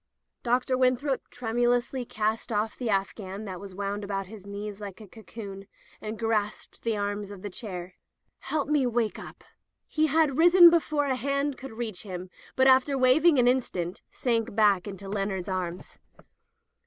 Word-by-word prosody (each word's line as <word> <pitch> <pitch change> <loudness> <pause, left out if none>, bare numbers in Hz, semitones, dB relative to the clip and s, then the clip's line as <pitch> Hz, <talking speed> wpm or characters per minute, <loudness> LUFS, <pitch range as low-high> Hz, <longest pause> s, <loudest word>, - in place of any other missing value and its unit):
Dr. 255 +1 +1
Winthrop 260 +2 +1
tremulously 245 +2 0
cast 220 +1 -2
off 215 +1 0
the 245 -3 -3
afghan 195 0 -2
that 185 -3 -6
was 195 -2 -10
wound 200 +1 -3
about 195 -1 -3
his 200 0 -12
knees 205 0 -6
like 200 -1 -7
a 215 - -11
cocoon, 200 -2 -9 0.3
and 215 +1 -5
grasped 215 -2 -2
the 225 -2 -1
arms 205 0 -3
of 200 -2 -10
his 205 -3 -6
chair. 180 -4 -6 0.5
"Help 300 -3 -2
me 290 -4 +2 0.3
up." - - -11 0.4
He 310 0 +1
had 305 -2 +2
risen 345 0 +9
before 305 -3 +1
a 265 -2 +1
hand 280 +2 -1
could 265 -2 -9
reach 220 -5 -4
him, 185 -2 -7 0.2
but 260 - +4
after 265 +1 +5
wavering 280 +5 +5
an 245 -1 +4
instant 190 -9 0
sank 230 -3 -1
back 205 -3 +3
into 195 -1 -7
Leonard's 195 -2 -2
arms. 185 -2 -4
220 Hz, 160 wpm, -27 LUFS, 200-260 Hz, 0.5 s, risen